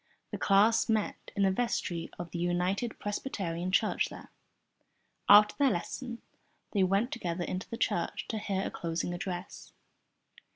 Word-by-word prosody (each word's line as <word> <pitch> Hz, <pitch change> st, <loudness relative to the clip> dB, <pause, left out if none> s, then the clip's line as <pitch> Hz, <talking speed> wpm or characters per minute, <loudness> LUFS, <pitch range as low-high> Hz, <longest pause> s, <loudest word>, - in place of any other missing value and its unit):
The -, -, -4 dB
class 205 Hz, +4 st, +4 dB
met 220 Hz, -2 st, -1 dB
in 200 Hz, -, +2 dB
the 195 Hz, -, +4 dB
vestry 190 Hz, -6 st, -1 dB
of 175 Hz, -1 st, -6 dB
the 170 Hz, -, -4 dB
United 180 Hz, +6 st, 0 dB
Presbyterian 185 Hz, -5 st, -3 dB
Church 215 Hz, +2 st, +2 dB
there. -, -, -11 dB, 1.0 s
After 210 Hz, +1 st, +8 dB
their 280 Hz, -1 st, +5 dB
lesson 235 Hz, +6 st, -4 dB, 0.5 s
they 200 Hz, -, +1 dB
went 195 Hz, +6 st, +2 dB
together 175 Hz, -6 st, -3 dB
into 185 Hz, +1 st, -4 dB
the 230 Hz, -, -5 dB
church -, -, -1 dB
to 220 Hz, -, -2 dB
hear 195 Hz, -2 st, -1 dB
a -, -, -3 dB
closing 170 Hz, +1 st, -3 dB
address. 175 Hz, 0 st, -6 dB
195 Hz, 150 wpm, -30 LUFS, 175-220 Hz, 1.0 s, After